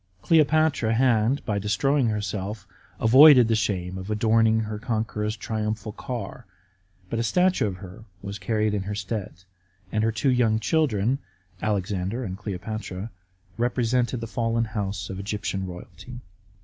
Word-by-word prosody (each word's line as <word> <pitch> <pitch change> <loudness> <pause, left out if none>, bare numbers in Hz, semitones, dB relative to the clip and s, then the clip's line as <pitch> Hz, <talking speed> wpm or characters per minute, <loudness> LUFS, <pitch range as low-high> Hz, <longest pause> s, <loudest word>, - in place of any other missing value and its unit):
Cleopatra 155 -7 +3
had, 125 +1 +2
by 105 -2 -1
destroying 130 +6 +1
herself, 105 -1 -3 0.3
avoided 130 +1 +8
the 115 - +2
shame 95 -4 -2
of 95 +2 -8
adorning 110 +1 +3
her 110 -1 -4
conqueror's 110 -2 -2
triumphal 110 -1 -3
car, 120 0 -6 0.6
but 115 - -1
a - - +1
statue 180 0 +2
of 95 - -4
her 95 +3 -11
was 100 +1 -7
carried 105 +2 0
in 105 - 0
her 100 +2 -4
stead, 100 -2 -5 0.5
and 110 0 0
her 115 - +2
two 115 +5 +1
young 120 -3 +3
children, 130 -3 +1 0.4
Alexander 100 +2 -1
and 95 -5 -4
Cleopatra, 105 +1 -6 0.5
represented 120 0 0
the - - -3
fallen 115 0 -1
house 100 -4 -4
of 95 - -6
Egyptian 100 -1 -3
royalty. 105 +7 -10
110 Hz, 140 wpm, -25 LUFS, 100-120 Hz, 0.6 s, avoided